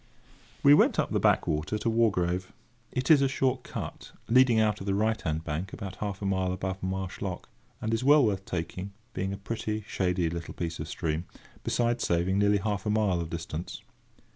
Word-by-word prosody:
We 140 - +8
went - - +5
up - - +1
the - - +2
backwater 75 +7 +1
to 105 - -3
Wargrave. 95 -6 +1 0.4
It 130 +4 +1
is 150 -3 +7
a 135 - +4
short 130 -1 0
cut, - - -7
leading 125 -1 +5
out 105 -1 +2
of 95 - -7
the 95 - +1
right 110 +2 +1
hand 80 0 -2
bank 80 +5 -4
about 100 -4 -6
half 100 -1 -4
a - - -1
mile 95 -1 +1
above 95 +1 -3
Marsh 95 -1 -3
Lock, - - -4 0.3
and 110 +1 -2
is 115 - 0
well 145 0 +6
worth 100 -3 0
taking, 95 +2 -4 0.2
being 95 +1 -2
a 100 - -4
pretty, 110 +1 -3
shady 90 -2 0
little 85 +1 -5
piece 85 -1 -4
of - - -4
stream, 80 +2 -2 0.4
besides 120 0 +1
saving 90 +3 +1
nearly 100 0 +4
half 105 +1 -2
a - - +2
mile 105 -5 +2
of 85 - -5
distance. 85 0 -5
95 Hz, 195 wpm, -28 LUFS, 90-110 Hz, 0.4 s, We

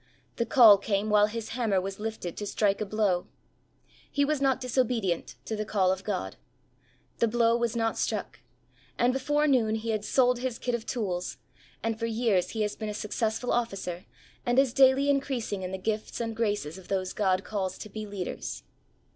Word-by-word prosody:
The 235 - 0
call 220 -6 +8
came 205 +1 -1
while 210 0 +5
his 225 +1 -5
hammer 225 -5 +1
was 195 +1 -5
lifted 215 -5 -4
to 205 - -4
strike 200 0 +1
a 215 - -1
blow. 200 -4 +1 0.8
He 285 0 +2
was 300 -1 0
not 270 -2 +2
disobedient 230 - 0
to 220 - -3
the 215 - -2
call 195 -3 +2
of 190 0 -3
God. 200 -3 -3 0.8
The 230 - +4
blow 230 0 +3
was 235 0 0
not 225 -1 0
struck, - - -2 0.6
and 245 +1 +3
before 295 +3 +1
noon 240 -7 +3
he 225 +1 -2
had 215 -2 -1
sold 250 +1 +3
his 250 -2 -2
kit 245 - -2
of 235 -1 -3
tools 185 -7 -2 0.5
and 225 -1 -1
for 230 - -1
years 220 -5 +1
he 220 -2 -1
has 210 - -2
been 215 -1 -4
a 210 - -4
successful 220 +3 -2
Officer 195 -7 -2 0.4
and 245 +1 0
is 270 -3 +4
daily 270 +1 +5
increasing 265 -8 0
in 185 0 -4
the 190 - -3
gifts 215 +3 -3
and 230 -1 -3
graces 205 -7 -1
of 185 - -15
those 185 -1 -1
God 190 -2 +1
calls 190 -4 -3
to - - -8
be 215 +1 -6
leaders. 200 -3 -5
220 Hz, 190 wpm, -28 LUFS, 195-240 Hz, 0.8 s, call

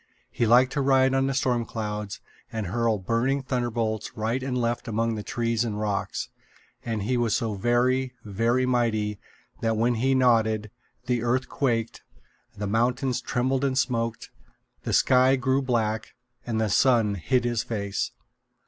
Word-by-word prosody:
He 115 - 0
liked 125 +3 +5
to 140 - 0
ride 135 -1 +4
on 135 0 +2
the 135 - 0
storm 125 -3 +1
clouds 105 -2 -5 0.3
and 110 -2 -3
hurl 115 +3 0
burning 120 +8 0
thunderbolts 120 -5 -2
right 115 +4 -1
and 130 -1 -2
left 120 -1 -1
among 115 +1 0
the 110 - -4
trees 115 +1 -1
and 105 -3 -3
rocks; 105 -2 -2 0.5
and 110 -3 -2
he 125 +4 0
was 120 -3 +1
so 115 -2 -1
very, 125 +4 +1
very 115 +5 +1
mighty 110 -5 0 0.4
that 115 -1 0
when 120 +2 +2
he 130 +4 +1
nodded, 110 -4 +2 0.3
the 125 -1 0
earth 125 +2 0
quaked, 115 -5 -1 0.6
the 105 - -3
mountains 125 +4 0
trembled 130 +2 0
and 135 -1 0
smoked, 115 -3 -1 0.5
the - - -2
sky 130 +1 +5
grew 130 +1 +1
black, 110 -4 -1 0.3
and 115 -2 -1
the 110 - +1
sun 115 -1 +3
hid 125 - 0
his 120 -2 0
face. 105 -3 -3
120 Hz, 155 wpm, -26 LUFS, 110-130 Hz, 0.6 s, liked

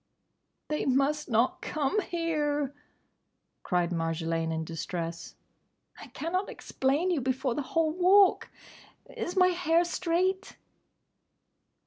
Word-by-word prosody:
"They 300 -1 -1
must 275 +3 +1
not 230 +2 +1
come 310 +8 0
here!" 295 -6 -1 0.9
cried 180 -1 0
Marjolaine 165 -1 -1
in 160 0 -2
distress. 165 +1 -5 0.6
"I - - -10
cannot 365 +5 -3
explain 290 +8 -1
you 320 -6 0
before 260 0 -1
the 295 - -2
whole 315 +3 0
Walk!—Is 365 0 +1
my 365 -1 +6
hair 345 -1 +2
straight?" 370 +3 -1
295 Hz, 100 wpm, -29 LUFS, 220-350 Hz, 0.9 s, my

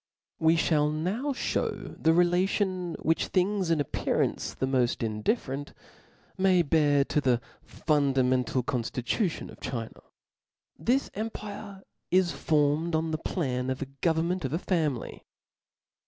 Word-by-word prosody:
We 160 +1 +4
fhall 150 -2 +2
now 190 - -1
(hew - - -2
the 160 - +4
relation 180 +1 +1
which 165 0 +1
things 190 -1 +1
in 165 -2 +2
appearance 145 - -1
the - - -1
moft 125 -3 +1
indifferent, 135 - -2 0.7
may 190 -1 +4
have 170 -5 +1 0.4
to 150 - +2
the 125 -3 +2 0.2
fundamental 130 -4 +1
conflitution 125 - -2
of - - -14
China. 120 -3 -5 0.7
This 245 - 0
empire 205 -2 -6 0.3
is 185 -1 +3
formed 155 +2 +1
on 160 0 0
the 155 - -1
plan 130 -8 -2
of 130 +1 -2
a 135 0 -11
government 170 +2 +1
of 135 +1 -2
a - - +2
family. 160 - -2
160 Hz, 125 wpm, -28 LUFS, 135-185 Hz, 0.7 s, We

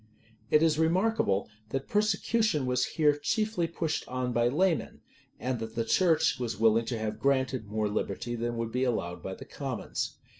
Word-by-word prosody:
[] 115 - -29
It 150 +3 +5
is 160 -1 +3
remarkable, 170 - +2 0.2
that 135 +3 -3
persecution 210 - +1
was 125 0 +1
here 150 -2 +3
chiefly 210 +4 0
pushed 165 -2 -2
on 125 -1 -2
by 120 0 +3
laymen; 165 +6 0 0.4
and 125 -2 -2
that 110 0 -6
the 115 -1 0
church 165 0 +3
was 115 -4 -3
willing 115 +1 +4
to 115 0 -2
have 110 -1 -3
granted 130 -4 +1
more 105 0 -1
liberty 105 +3 -3
than 120 0 -2
would 115 -1 -2
be 125 +2 0
allowed 90 -9 -1
by 95 - -5
the - - -10
commons. 135 -5 -4
130 Hz, 180 wpm, -29 LUFS, 115-160 Hz, 0.4 s, It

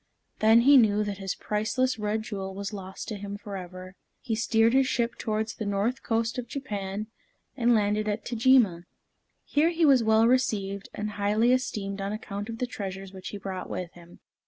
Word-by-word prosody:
Then 220 +2 +6
he 280 +3 +7
knew 210 -3 +4
that 205 -1 -4
his 195 -1 -3
priceless 225 +4 -1
red 210 +1 -1
jewel 195 -4 -5
was 200 +1 -5
lost 190 -1 -7
to 215 - -4
him 200 0 -6
forever. 185 -3 -8 0.3
He 230 - -3
steered 225 +1 +3
his 265 0 +4
ship 235 -2 0
towards 215 0 -2
the - - -6
north 205 +6 0
coast 225 +1 -1
of 245 - -6
Japan, 210 -6 -4 0.5
and 240 -2 +3
landed 210 0 +1
at 210 +1 -2
Tajima. 230 -8 +3 0.6
Here 305 +3 +2
he 335 -1 +2
was 270 -4 +6
well 220 +1 +4
received, 200 -6 0
and 210 0 -3
highly 215 +4 +3
esteemed 205 -6 -2
on 195 +1 -2
account 205 0 -6
of 225 - -5
the 250 - -1
treasures 195 -4 -6
which 190 0 -8
he 205 - -5
brought 190 -2 -6
with 180 -2 -4
him. 175 0 -16
215 Hz, 185 wpm, -27 LUFS, 195-235 Hz, 0.6 s, he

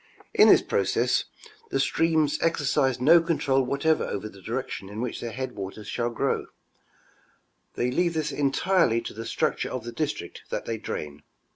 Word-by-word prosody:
In - - +7
this - - +7
process, - - +1 0.4
the - - 0
streams 160 -3 +2
exercise 140 -5 +1
no 165 +7 +6
control 150 -5 +1
whatever 140 +5 +1
over 100 +1 -4
the 100 -2 -13
direction 95 +1 -4
in 105 +2 -7
which 120 0 -3
their 120 - -4
headwaters 105 -4 -6
shall 120 +2 -1
grow; 120 - -1 1.3
they 125 +1 0
leave 170 +4 +1
this 155 -1 -1
entirel}" 145 -2 +2
to - - -6
the 115 +1 -6
structure - - -1
of 130 -3 -4
the 120 - -6
district 140 - -4
that - - -3
they 115 -1 -3
drain. 75 -8 -6
130 Hz, 160 wpm, -26 LUFS, 115-155 Hz, 1.3 s, In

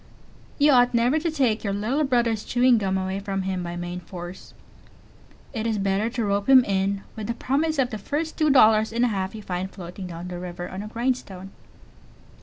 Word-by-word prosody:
You 290 0 +5
ought 245 -2 +4
never 245 +6 +3
to 335 +2 -1
take 260 -8 +1
your 200 -2 -1
little 230 +9 0
brother's 235 -5 +1
"chewing 245 -1 +3
gum" 190 -2 0
away 190 +1 -2
from 195 -1 -3
him 185 -1 -2
by 175 0 -5
main 175 +1 -5
force; 175 0 -10 1.0
it 225 -2 -2
is 220 -2 0
better 200 +2 0
to 235 -2 -2
rope 200 +3 -1
him 260 -2 +8
in 195 0 0
with 215 -2 -5
the 235 - -2
promise 305 +6 0
of 255 -2 +1
the 215 - -4
first 305 +9 -3
two 310 -1 +2
dollars 220 -5 +5
and 235 +2 +2
a - - +1
half 190 -1 -3
you 215 - -8
find 185 0 -3
floating 185 0 -8
down 170 0 -7
the 175 -1 -6
river 175 0 -6
on 190 - -6
a 210 - -6
grindstone. 220 -5 -3
215 Hz, 210 wpm, -24 LUFS, 190-245 Hz, 1.0 s, him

